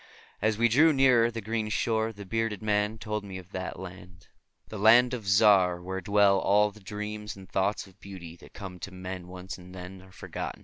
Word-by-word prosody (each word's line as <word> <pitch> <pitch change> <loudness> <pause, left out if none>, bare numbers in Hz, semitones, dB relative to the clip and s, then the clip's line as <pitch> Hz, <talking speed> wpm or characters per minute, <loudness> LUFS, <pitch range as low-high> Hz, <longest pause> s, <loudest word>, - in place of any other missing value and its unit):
As 110 0 +1
we 120 +1 +4
drew 150 +8 +5
nearer 130 -5 +4
the 115 -1 -6
green 110 0 -2
shore 110 +1 0
the 100 -2 -10
bearded 115 0 -2
man 105 0 0
told 105 0 -4
me 95 -2 -7
of 95 0 -12
that 95 -1 -5
land, 90 -1 -11 0.4
the 110 - -7
Land 120 +4 +6
of 115 -5 -5
Zar, 95 -3 +5
where 95 +2 -5
dwell 100 0 +4
all 105 +2 +3
the 110 - -16
dreams 105 0 -6
and 95 -1 -13
thoughts 95 +3 -1
of 95 0 -20
beauty 90 -4 -10
that - - -17
come 95 -3 -8
to 100 - -7
men 90 -1 -7
once 90 +1 -8
and 90 +1 -13
then 90 +1 -9
are 95 0 -17
forgotten. - - -6
100 Hz, 210 wpm, -28 LUFS, 95-110 Hz, 0.4 s, Land